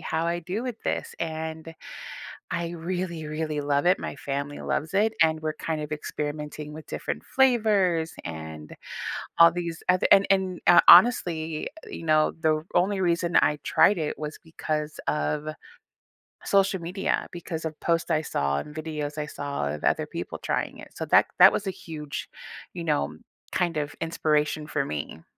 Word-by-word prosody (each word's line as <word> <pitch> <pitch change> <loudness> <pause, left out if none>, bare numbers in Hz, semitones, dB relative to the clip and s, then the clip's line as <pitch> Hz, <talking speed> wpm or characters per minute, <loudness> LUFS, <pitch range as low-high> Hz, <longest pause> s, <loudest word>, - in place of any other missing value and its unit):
how 160 +1 -1
I 170 +1 -1
do 185 +7 -4
with 245 -3 -4
this." - - -2
And 160 0 -5 0.8
I 170 -1 -2
really, 170 -1 -4
really 155 0 -2
love 145 0 +1
it, 180 +2 +4
my - - -5
family 140 +1 -4
loves 155 +5 -2
it, 215 +3 +3
and 160 -1 +4
we're 155 0 -2
kind 155 0 -3
of 150 0 -6
experimenting 150 0 -5
with 155 0 -10
different 75 +1 -4
flavors 210 -10 +2
and 80 -2 -7 0.7
all 170 0 +9
these 170 -1 -4
oth 180 0 +4
and 195 - +7
and, 190 -2 +1
uh 175 -1 +8
honestly, 170 -6 +6 0.2
you - - -7
know, 155 -1 +3
the 155 -1 +1
only 190 +2 +2
reason 170 -1 +1
I 150 - +3
tried 205 - +4
it 155 -3 -3
was 150 0 -5
because 155 -1 -4
of 150 0 -1 1.0
social 195 -1 +2
media, 180 +3 -1
because 165 -2 -6
of 160 -1 -5
post 170 0 0
I 155 -1 +2
saw 70 - -1
and 150 - -8
videos 155 -2 -4
I 150 - -2
saw 140 - -3
of 75 - -7
other - - +2
people - - -6
trying - - -2
it. - - -11
So - - -4
that - - +5
that - - +10
was 210 - -2
a 190 - -1
huge, 155 -4 -7 0.5
you 175 - -4
know, 75 - 0 0.3
kind 175 -3 0
of 145 -1 -3
inspiration 155 -2 0
for 140 -2 -1
me. 75 - -5
160 Hz, 170 wpm, -26 LUFS, 150-175 Hz, 1.0 s, that